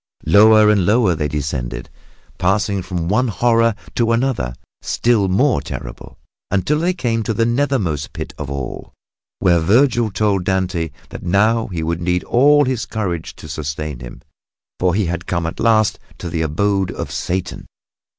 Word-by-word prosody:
Lower 110 +5 +6
and 100 -3 +2
lower 105 -1 +3
they 75 -2 -1
descended, 70 -5 -4 0.5
passing 100 +2 +1
from 90 -2 -4
one 110 +7 +2
horror 115 0 +2 0.2
to 115 -1 +1
another 115 - -1 0.3
still 115 -5 +1
more 125 +8 +2
terrible, - - -8 0.3
until 100 +11 +1
they 175 +2 0
came 115 -8 -1
to 110 0 -2
the 115 - +2
nethermost 120 - 0
pit - - -7
of 75 -3 -6
all, 70 -3 -6 0.4
where 90 -3 +3
Vergil 115 - +3
told 100 -2 0
Dante 95 -3 -1 0.2
that - - -8
now 110 +5 +2
he 85 -5 -4
would 85 +1 -2
need 90 0 0
all 145 +4 +4
his 125 -3 -2
courage 90 -7 -4
to - - -11
sustain 75 -1 -5
him, - - -10 0.6
for 90 -1 +2
he 105 -1 +1
had 90 +1 -4
come 85 -2 -1
at 80 - -5
last 110 -2 +2 0.2
to 85 - -6
the 80 - -1
abode 95 +5 0
of - - -5
Satan. 90 0 -3
95 Hz, 160 wpm, -19 LUFS, 85-115 Hz, 0.6 s, Lower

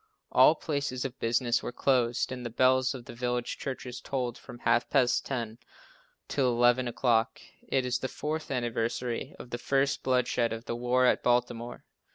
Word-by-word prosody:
All - - +6
places 140 -5 -3
of 130 -1 -6
business 120 +1 +1
were - - -4
closed 125 -2 +1
and 125 -1 -5
the 120 - -4
bells 130 +2 +3
of 120 -2 -9
the 120 - -9
village 120 0 -2
churches 130 -2 -5
tolled 125 -3 -2
from 125 -2 -11
half 120 0 +1
past 130 -3 +2
ten 115 -4 -4 0.7
till 135 -3 +1
eleven 120 +1 +3
o'clock. 115 -2 +1 0.3
It 130 -1 +1
is 125 0 0
the 130 - -2
fourth 155 +3 -4
anniversary 120 -1 -2
of 120 - -11
the 120 - -3
first 140 +2 +1
bloodshed 125 -2 +1
of 115 +1 -7
the 115 - -3
war 125 +1 +2
at - - +3
Baltimore. 120 -1 -1
125 Hz, 175 wpm, -29 LUFS, 120-130 Hz, 0.7 s, All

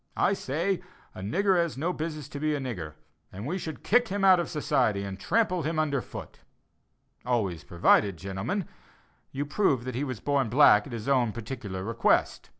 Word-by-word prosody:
I 195 - +3
say 175 +3 -1 0.3
a - - -9
'nigger 190 - +2
has 170 -5 0
no 170 +6 -1
business 155 -3 -5
to 140 - -6
be 155 0 0
a - - -2
nigger,' 90 - -5 0.4
and 100 +4 -7
we 180 +7 -2
should 160 -3 -7
kick 245 +2 +3
him 195 0 0
out 185 -2 +7
of 175 - -2
society 125 - +1
and 100 -1 -6
trample 185 - +1
him 160 +1 -2
under 145 -4 +1
foot - - -10 0.8
always 105 -9 -1
provided, 90 +2 +3
gentlemen, 100 - -3 0.6
you 140 +2 -3
prove 140 - +1
he 130 +2 -3
was 130 -6 -4
born 140 -2 0
black 110 -4 +6
at - - -10
his 115 0 -6
own 125 -5 +3
particular 110 -5 -6
request. 115 +3 +1
135 Hz, 180 wpm, -28 LUFS, 105-170 Hz, 0.8 s, out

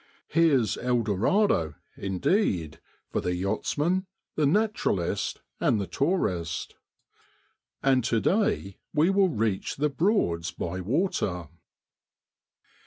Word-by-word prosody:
Here's 145 -8 +3
El 125 -1 +1
Dorado, 105 - +2 0.2
indeed, 95 - 0 0.3
for - - 0
the 90 0 -1
yachtsman, 150 - 0 0.3
the 150 -2 +2
naturalist, 205 - 0 0.2
and 110 - +2
the 100 - -1
tourist! 90 - -1 1.1
And 130 -2 +3
to 115 -2 +2
day 180 - 0 0.2
we 160 +5 +4
will 195 -1 +4
reach 110 - -1
the 150 +2 +1
Broads 135 - +1
by 90 +1 -4
water. 95 - -1
120 Hz, 105 wpm, -27 LUFS, -, 1.1 s, we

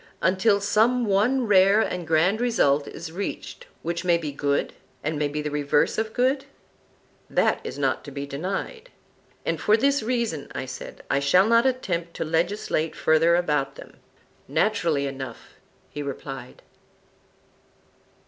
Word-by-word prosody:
Until 195 +3 +3
some 230 +4 +2
one 225 +6 +2
rare 195 0 +5
and 180 -6 -2
grand 170 +8 +2
result 145 - +2
is 160 0 -8
reached 200 - -6 0.2
which 170 +1 -2
may 175 -2 +3
be 155 -3 -4
good, 140 0 -1 0.3
and 150 +2 -1
may 150 - +1
be 150 +1 -4
the 150 - -3
reverse 145 +5 +1
of 220 0 -2
good? 260 +4 +1 0.8
That - - +2
is - - -6
not - - 0
to - - -8
be 140 0 -5
denied. 190 - -5 0.6
And - - -1
for 210 +1 +4
this 280 +3 +2
reason, 225 - -2
I - - -3
said, 130 - -9
I 140 - +3
shall 160 +7 +4
not 230 +3 +4
attempt 175 -10 -2
to - - -3
legislate 165 0 -1
further 165 +2 +3
about 150 -5 0
them. - - -13 0.5
Naturally 170 -9 +1
enough, 135 -1 -8 0.3
he 145 - -5
replied. 135 -2 -7
175 Hz, 150 wpm, -25 LUFS, 150-220 Hz, 0.8 s, rare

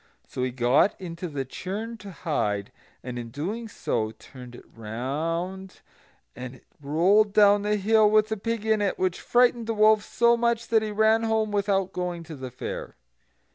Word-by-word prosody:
So - - -6
he 130 - 0
got 125 +9 +2
into 180 -1 -6
the 140 -4 -4
churn 205 - -5
to 200 0 -10
hide, 125 - -2 0.3
and 125 -1 -5
in 115 -1 -7 0.4
so 160 - -2
doing - - -12
turned 125 -2 -12
it - - -13
round, 165 - -4 0.5
and 125 +1 -8
it 125 - -20 0.2
rolled 190 +9 +3
down 205 -1 +5
the 210 +1 0
hill 215 +1 +4
with 215 0 +3
the 220 - -2
pig 230 +1 -3
in 220 -1 +2
it, 200 - 0
which 185 -1 -1
frightened 240 -2 +2
the 225 - -1
wolf 215 0 +5
so 235 +2 +3
much 235 0 0
that 225 -1 +4
he 215 - -3
ran 220 +2 +3
home 220 -1 0
without 195 -2 0
going 180 -2 -3
to 160 -1 -9
the 130 -2 -7
fair. 125 - -7
195 Hz, 180 wpm, -26 LUFS, 140-215 Hz, 0.5 s, down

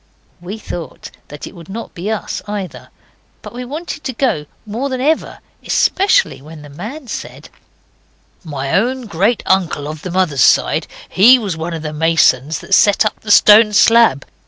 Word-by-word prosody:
We 190 +5 -7
thought 175 -6 -8 0.2
that 150 0 -9
it - - -12
would 170 0 -13
not 225 +4 -7
be 180 +5 -5
us 220 -1 -4
either, 205 -3 -6 0.5
but - - -10
we 250 +1 -6
wanted 300 +3 -7
to 260 - -3
go 225 - -1 0.2
more 235 +7 -4
than 260 -1 -3
ever, 305 +5 -1 0.3
especially 400 - +1
when 155 +1 -12
the 145 - -12
man 220 - -8
said - - -8 0.9
'My 140 -4 -5
own 250 +4 0
great 205 +4 0
uncle 175 -6 0
of 155 0 -7
the 185 - -6
mother's 175 -7 0
side, - - +2 0.2
he 235 +7 +6
was 205 -8 -4
one 165 +1 -5
of 160 - -7
the 155 -1 -5
masons 160 -2 +2
that 195 - -5
set 205 +2 +4
up 215 - -2
the 215 - -11
stone 210 +1 +6
slab. 225 - +4
195 Hz, 175 wpm, -16 LUFS, 160-235 Hz, 0.9 s, he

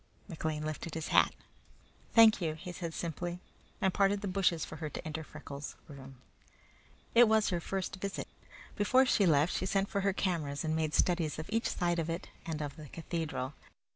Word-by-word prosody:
McLean 155 -4 -3
lifted 155 +1 -4
his 160 -1 -3
hat. - - +5 0.8
"Thank 225 -3 +8
you," 160 -2 -1
he 175 +3 -7
said 170 -2 -5
simply, 175 +1 -3 0.4
and 190 -1 +2
parted 200 0 +3
the 205 - -3
bushes 180 -3 +1
for 155 - -8
her 155 -1 -4
to - - -7
enter 160 0 -4
Freckles' 145 -2 -8
room. 135 -2 -11 1.0
It 235 0 +8
was 220 -1 +3
her 175 -3 0
first 195 +3 -3
visit. 195 +1 -4 0.5
Before 255 +6 +4
she 205 -6 +3
left 150 +1 +4
she 185 - -1
sent 195 +1 +1
for 200 - 0
her 195 +1 +2
cameras 160 -8 -1
and 160 0 0
made 155 -1 0
studies 170 -4 +2
of 155 - -6
each 225 +1 +1
side 175 -1 0
of 165 0 -2
it 170 +3 -4 0.2
and 155 -2 -2
of 145 +1 -6
the 155 -1 -9
cathedral. 160 -5 -3
170 Hz, 190 wpm, -32 LUFS, 155-195 Hz, 1.0 s, Thank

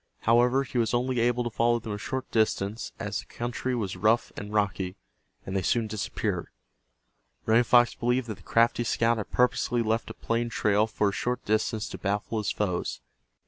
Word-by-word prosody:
However, 120 +4 +4
he 125 -2 -3
was 115 0 +1
only 125 0 0
able 120 +1 +2
to 120 - -3
follow 120 +1 +2
them 115 -2 -6
a 105 - -3
short 130 +4 -4
distance, 110 -1 0
as 105 -2 -3
the - - -8
country 120 +2 -3
was 100 -6 -2
rough 110 +3 +2
and 105 0 -7
rocky, 100 -3 0 0.5
and 95 - -4
they 95 - +1
soon 115 +5 +1
disappeared. 110 -2 -3 1.0
Running 115 +2 +5
Fox 120 +1 +5
believed 125 +1 0
that 110 -4 -6
the - - -18
crafty 115 +1 +2
scout 115 0 +2
had 110 - -4
purposely 125 -1 +1
left 110 +1 -1
a - - -8
plain 115 +1 -1
trail 105 -1 +2
for 105 -2 +1
a - - -5
short 125 +4 -2
distance 110 0 0
to - - -7
baffle 105 +3 -1
his 105 - -1
foes. 90 -4 -2
115 Hz, 190 wpm, -27 LUFS, 105-120 Hz, 1.0 s, Running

